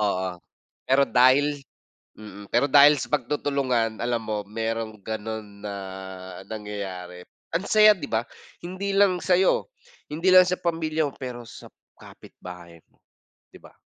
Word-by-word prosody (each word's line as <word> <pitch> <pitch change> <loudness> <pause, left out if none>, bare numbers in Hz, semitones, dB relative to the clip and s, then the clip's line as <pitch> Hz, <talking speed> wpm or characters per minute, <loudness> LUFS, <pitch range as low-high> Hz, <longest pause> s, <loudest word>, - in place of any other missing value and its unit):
Oo. 95 -3 0 0.6
Pero 135 +1 +4
dahil 140 +3 +3 0.6
mm, 105 -1 -11
pero 125 +4 +3
dahil 145 +1 +6
sa - - -4
pagtutulungan, 130 -4 -1
alam 120 -1 0
mo 110 -2 -4
merong 110 +1 -4
ganon 110 -1 -7
na 100 -1 -5 0.7
nangyayari. 95 -4 -7 0.3
Ang 175 - 0
saya, 215 -1 +6
di 155 - -7
ba? 115 +3 -1 0.3
Hindi 185 +3 -5
lang 195 -2 +2
sayo, 185 - +2 0.4
hindi 165 +5 -3
lang 185 - +10
sa 180 0 -2
pamilya 160 -2 -1
mo, 140 - -9
pero 120 -2 -8
sa - - -13 0.2
kapitbahay 85 -2 -13
mo. - - -35 0.5
Di - - -15
ba? - - -18
120 Hz, 140 wpm, -25 LUFS, 105-150 Hz, 0.7 s, lang